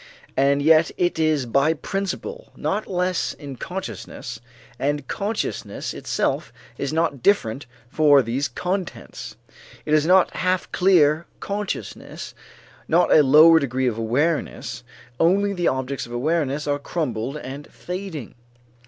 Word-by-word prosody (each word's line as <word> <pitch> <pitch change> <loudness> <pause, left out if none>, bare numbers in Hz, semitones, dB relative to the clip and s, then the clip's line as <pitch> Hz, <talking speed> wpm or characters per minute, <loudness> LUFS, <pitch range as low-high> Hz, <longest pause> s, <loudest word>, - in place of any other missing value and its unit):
And 140 +1 +3
yet 160 +1 +5
it 175 -2 0
is 155 -4 +2
by 140 +7 +2
principle 200 - -4
not 210 +2 -2
less 180 -1 -1
in 140 -3 -9
consciousness, 150 -9 -6 0.4
and 145 -1 -1
consciousness 210 +2 -3
itself - - -2 0.2
is 140 - -3
not 160 -4 0
different 135 - +1 0.2
for 145 0 +5
these 125 +5 -1
contents. 185 0 -5 0.5
It 150 - -1
is 155 0 +4
not 185 0 +4
half 185 0 0
clear 170 -4 +3
consciousness, 205 0 -5 0.5
not 175 +2 +4
a 155 - +8
lower 155 +4 +7
degree 130 -2 -1
of 115 -3 0
awareness, 145 +9 -1 0.4
only 200 +4 +3
the 175 -3 0
objects 130 0 -2
of - - -13
awareness 145 +2 0
are 145 0 0
crumbled 140 -4 -3
and 140 0 -8
fading. 180 - -6
155 Hz, 125 wpm, -23 LUFS, 140-180 Hz, 0.5 s, a